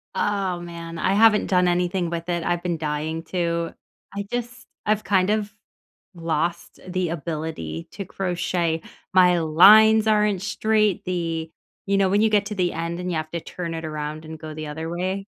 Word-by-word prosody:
oh, 195 -4 0
man, 170 -1 -8
I 190 - +1
haven't 215 0 +5
done 180 -1 +3
anything 175 0 0
with 170 +1 -5
it. 170 -1 -1
I've 175 0 -1
been 170 -2 -1
dying 155 +1 -3
to. 170 -1 -1 0.4
I 200 0 -3
just 240 -1 -4 0.2
I've 215 0 +1
kind 190 -1 +2
of 210 -1 -1 0.6
lost 170 +1 -2
the 180 -2 -1
ability 155 - -5
to 195 - -6
crochet. 175 -3 -1 0.3
My 180 -2 +5
lines 215 +7 +7
aren't 210 -3 +2
straight, 210 -1 +1
the 165 -3 -2 0.4
you 200 0 +2
know, 195 -1 +3
when 205 +2 +3
you 220 - +4
get 205 -1 +2
to 210 - -5
the 180 -2 0
end 170 +1 -3
and 180 0 -3
you - - -1
have 155 0 -4
to 170 - -2
turn 170 -2 -6
it 160 0 -5
around 155 0 -5
and 160 0 -8
go 155 -1 -7
the 155 0 -6
other 160 +2 -5
way? 185 +3 -3
175 Hz, 185 wpm, -23 LUFS, 165-195 Hz, 0.6 s, lines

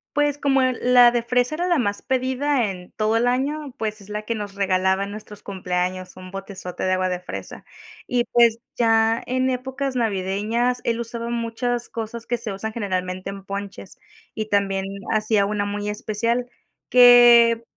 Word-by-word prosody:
Pues, 290 0 +1
como, 275 -2 +2
eh, 255 -1 +1
la 245 -1 +6
de 240 -1 -1
fresa 250 +4 +1
era 350 - -1
la 345 -5 +2
más 205 -4 -1
pedida 260 -1 0
en 180 -2 -9
todo 215 +1 +2
el 235 - +2
año, 275 +3 -1
pues, 215 -1 -3
es 200 +1 -15
la 210 0 -3
que 225 +2 -3
nos 205 -2 -6
regalaba 190 0 +1
en 200 - -8
nuestros 210 -1 -10
cumpleaños, 185 -1 -3
un 185 0 -10
botezote 195 -2 -7
de 185 - +1
agua 185 0 0
de 180 - -2
fresa 180 - -8 0.4
y, 245 -1 0
pues, 235 -1 +3 0.2
ya 225 0 +3
en 255 +1 0
épocas 265 +1 -3
navideñas, 225 +3 0
él 230 0 -1
usaba 235 0 -4
muchas 235 +1 -2
cosas 230 0 -6
que 240 - 0
se 210 -4 -5
usan, 220 +3 -5
generalmente 185 -3 -3
en 195 -1 -9
ponches, 200 -1 -7 0.4
y 215 0 -4
también 195 -1 0 0.3
hacía 215 -2 +2
una 210 -1 -1
muy 205 0 -3
especial 230 +4 -1 0.4
que, 240 -2 +7
225 Hz, 175 wpm, -22 LUFS, 200-245 Hz, 0.4 s, que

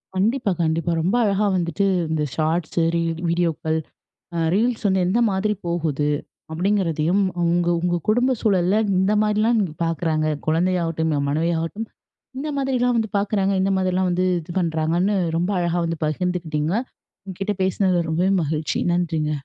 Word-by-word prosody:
கண்டிப்பா, 215 +3 +1
கண்டிப்பா 165 +1 0
ரொம்ப 185 +7 +1
அழகா 205 0 +1
வந்துட்டு 180 +3 0 0.2
இந்த 155 -1 0
ஷார்ட்ஸ், 160 +1 -1 0.2
ரீல், 165 0 -1
வீடியோக்கள், 165 -2 0 0.8
ரீல்ஸ் 225 +1 0
வந்து 190 -1 +2
எந்த 220 +6 +2
மாதிரி 205 +3 0
போகுது. 155 -4 -1 0.4
அப்டிங்கிறதையும் 180 0 +1 0.2
உங்க 170 0 +1
உங்க 175 0 0
குடும்ப 245 +4 +3
சூழல்ல 190 -2 +2 0.2
இந்த 195 +2 +2
மாதிரிலாம் 215 +2 +2 0.2
பாக்குறாங்க. 160 -2 0 0.2
குழந்தையாகட்டும், 165 -1 +1
என் 140 - -1
மனைவியாகட்டும் 165 +7 -1 0.5
இந்த 300 +3 -3
மாதிரிலாம் 250 -3 +1
வந்து 220 -2 0
பாக்குறாங்க, 200 -1 +1
இந்த 195 +1 +1
மாதிரிலாம் 185 0 +1
வந்து 180 +1 +1
இது 170 +1 -9
பண்ணுறாங்கன்னு, 170 +4 +1 0.2
ரொம்ப 175 +3 0
அழகா 175 0 0
வந்து 165 -1 -3
பகிர்ந்துக்கிட்டீங்க. 160 -1 -1 0.5
உங்க 190 -2 -8
கிட்ட 205 +1 0
பேசுனதுல 185 -3 +1
ரொம்பவே 180 +4 +1
மகிழ்ச்சி. 155 0 -2 0.2
நன்றிங்க. 160 -3 0
175 Hz, 135 wpm, -22 LUFS, 165-200 Hz, 0.8 s, குடும்ப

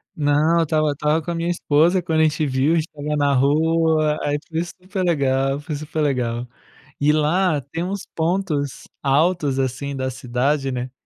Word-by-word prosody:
Não, 150 +3 +2
eu - - +3
estava 155 -1 +1
eu - - 0
estava 150 +3 0
com 175 - -4
a - - -3
minha 170 +1 -2
esposa 170 +2 +2
quando 160 -2 0
a 160 - +5
gente 155 0 +1
viu, 135 +4 +1
gente 160 -1 +1
estava 150 0 -4
na 145 -1 +2
rua, 155 +2 +2
aí 145 0 0
foi 165 +1 -2
super 185 +2 -5
legal 135 -4 +1
foi 150 +1 -5
super 155 +1 -4
legal. 125 -4 -1 0.5
E 150 - +4
lá 155 +1 +2
tem 165 +1 -2
uns 195 +2 -4
pontos 160 -5 -1
altos 145 0 +2
assim 135 +2 -2
da 130 0 -2
cidade 130 +3 -1
né, 125 0 -4
150 Hz, 185 wpm, -21 LUFS, 140-165 Hz, 0.5 s, a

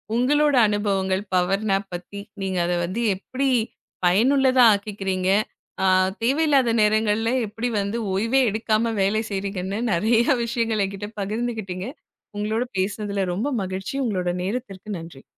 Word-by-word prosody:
உங்களோட 290 +4 +3
அனுபவங்கள் 195 -2 0
power 185 +3 +1
nap 195 0 0
பத்தி 180 +3 -7 0.2
நீங்க 190 -1 -2
அதை 175 0 0
வந்து 190 +7 -3
எப்படி 260 +8 -3 0.6
பயனுள்ளதா 255 +7 +4
ஆக்கிக்கிறீங்க, 195 -2 -2 0.5
அ - - +3 0.4
தேவையில்லாத 275 -1 +3
நேரங்கள்ல 215 +1 +2 0.2
எப்படி 225 +4 -3
வந்து 200 +3 -2 0.2
ஓய்வே 230 +7 +2
எடுக்காம 220 +1 0
வேலை 205 +3 +2
செய்கிறீங்கன்னு 195 0 -3
நிறையா 225 +8 +3
விஷயங்களை 230 -3 0
என்கிட்ட 200 +1 -6
பகிர்ந்துக்கிட்டீங்க. 215 -2 -3 0.5
உங்களோட 215 +3 0 0.2
பேசுனதுல 200 0 -1
ரொம்ப 220 +10 -2 0.2
மகிழ்ச்சி. 190 +6 -5
உங்களோட 185 -5 -1
நேரத்திற்கு 210 -1 -5
நன்றி. 165 -5 -11
210 Hz, 120 wpm, -23 LUFS, 190-230 Hz, 0.6 s, பயனுள்ளதா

